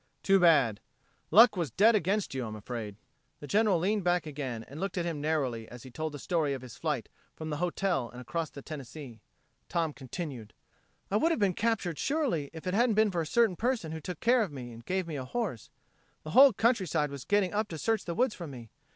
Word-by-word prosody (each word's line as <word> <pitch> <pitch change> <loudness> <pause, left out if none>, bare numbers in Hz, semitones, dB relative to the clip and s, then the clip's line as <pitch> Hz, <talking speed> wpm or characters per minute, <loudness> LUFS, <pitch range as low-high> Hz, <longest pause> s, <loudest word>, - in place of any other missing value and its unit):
Too 195 0 +5
bad.... 140 - +4 0.5
Luck 220 +5 +7
was 170 -5 -1
dead 220 +4 +5
against 200 -2 0
you, 130 -1 -2
I'm 110 - -6
afraid." 105 -1 -6 0.4
The - - -8
General 205 +2 +3
leaned 200 +4 0
back 175 -1 +1
again 135 -6 -5
and 140 +4 -9
looked 195 0 -3
at 175 - 0
him 165 -4 -3
narrowly 135 -8 -1
as 120 -1 -11
he 130 - -11
told 155 +5 -3
the - - -5
story 155 -3 0
of 130 - -8
his 125 - -10
flight 150 -9 -2 0.3
from 155 -1 -6
the 150 - -2
hotel 180 -6 -1
and 125 - -11
across 160 +5 -3
the 140 - -11
Tennessee. 135 -5 -9 0.5
Tom 165 -3 0
continued: 130 - -7 0.6
"I 205 - +3
would 325 - +3
have - - +1
been 200 -3 +2
captured 200 -7 -1
surely 270 - 0
if 160 +1 -10
it 180 - -1
hadn't 230 +1 +3
been 215 -1 +4
for 175 -2 0
a 160 - -4
certain 225 0 +3
person 230 -7 -1
who 160 0 -5
took 180 +4 -6
care 245 +1 +4
of 200 -7 -1
me, 125 -4 -7
and 115 0 -11
gave 185 +6 -1
me 160 -3 -5
a 130 - -4
horse. 175 - -4 0.5
The 155 - -7
whole 270 - +8
countryside 190 - +1
was 140 -2 -7
getting 205 +1 +1
up 210 +1 0
to 165 - -6
search 225 +5 0
the 170 - -3
woods 245 0 +2
for 170 - -7
me. 120 -6 -10
165 Hz, 230 wpm, -30 LUFS, 135-200 Hz, 0.6 s, whole